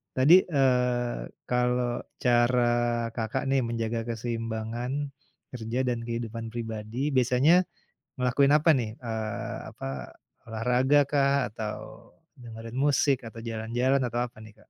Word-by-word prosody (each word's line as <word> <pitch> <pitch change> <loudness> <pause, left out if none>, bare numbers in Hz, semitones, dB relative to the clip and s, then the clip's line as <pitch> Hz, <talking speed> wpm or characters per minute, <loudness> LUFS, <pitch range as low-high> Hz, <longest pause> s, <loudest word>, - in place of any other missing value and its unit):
tadi, 135 +6 +6
eee, 125 -5 +1 0.2
kalau 125 0 +2 0.4
cara 120 0 +4 0.5
Kakak 115 +3 -2
nih 135 0 +3
menjaga 115 0 -2
keseimbangan, 115 +1 -3 0.6
kerja 120 0 -3
dan 120 -1 0
kehidupan 115 -1 -4
pribadi 110 -1 -5 0.2
biasanya, 130 +5 +4 0.6
ngelakuin 135 +3 +3
apa 155 +2 +2
nih, 115 -3 -2
eee, 110 - -4
apa - - -9 0.6
olahraga 125 +5 +2
kah 140 -1 +3 0.2
atau, 105 0 -5 0.6
dengerin 115 0 -8
musik 140 -1 +3
atau 115 - -10
jalan-jalan 120 +4 0
atau 120 +1 -2
apa 120 - -13
nih 110 -1 -12
Kak - - -34
120 Hz, 120 wpm, -27 LUFS, 115-125 Hz, 0.6 s, tadi